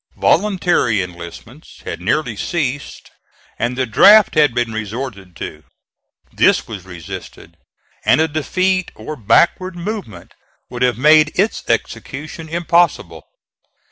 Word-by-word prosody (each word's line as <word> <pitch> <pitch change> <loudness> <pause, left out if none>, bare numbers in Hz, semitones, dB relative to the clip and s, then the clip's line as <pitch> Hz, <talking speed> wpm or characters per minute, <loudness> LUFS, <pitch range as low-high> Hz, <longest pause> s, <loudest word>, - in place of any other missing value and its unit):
Voluntary 175 - +2
enlistments 85 -1 -11
had - - -6
nearly 120 - -1
ceased 140 - -4 0.5
and 120 +2 -2
the 130 - +1
draft 205 - +6
had 150 -4 +4
been 120 -1 -2
resorted 105 -4 -6
to; - - -8 0.7
this - - +3
was 100 -5 -8
resisted, 90 -3 -10 0.5
and - - +3
a 160 - +3
defeat 185 +5 -1
or 155 - -7
backward 175 - +2
movement 175 - -7 0.4
would 120 -1 -6
have 125 -2 +2
made 155 +3 +5
its 205 +4 0
execution 145 +8 -4
impossible. 170 0 0
140 Hz, 115 wpm, -18 LUFS, 110-170 Hz, 0.7 s, draft